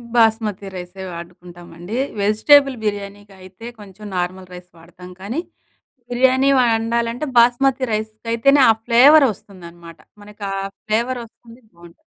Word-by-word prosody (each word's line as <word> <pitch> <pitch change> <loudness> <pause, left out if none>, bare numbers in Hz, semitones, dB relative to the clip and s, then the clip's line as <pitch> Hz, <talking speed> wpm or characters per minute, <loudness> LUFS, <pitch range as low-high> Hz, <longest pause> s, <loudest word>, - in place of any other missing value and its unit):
బాస్మతి 220 -3 +1
రైసే 180 +1 -9
వాడుకుంటామండి. 175 +3 -10 0.2
వెజిటబుల్ 270 +7 +4
బిర్యానీకి 205 -1 -5
అయితే 185 +5 -14
కొంచెం 205 +1 -13
నార్మల్ 185 +1 -4
రైస్ 180 0 -12
వాడతాం 180 +2 -15
కానీ, 230 +11 -4 0.7
బిర్యానీ 260 +2 +2
వండాలంటే 235 +2 0
బాస్మతి 250 +3 +3
రైస్ 215 0 -3 0.2
అయితేనే, 275 +4 +3
ఆ - - +8
ఫ్లేవర్ 275 +5 +6
వస్తుందనమాట. 170 -4 -14 0.2
మనకు 210 0 -13
ఆ - - -3 0.3
ఫ్లేవర్ 235 +4 -1
వస్తుంది 230 +1 -19
బావుంటుంది. 170 0 -17
215 Hz, 120 wpm, -19 LUFS, 180-240 Hz, 0.7 s, ఆ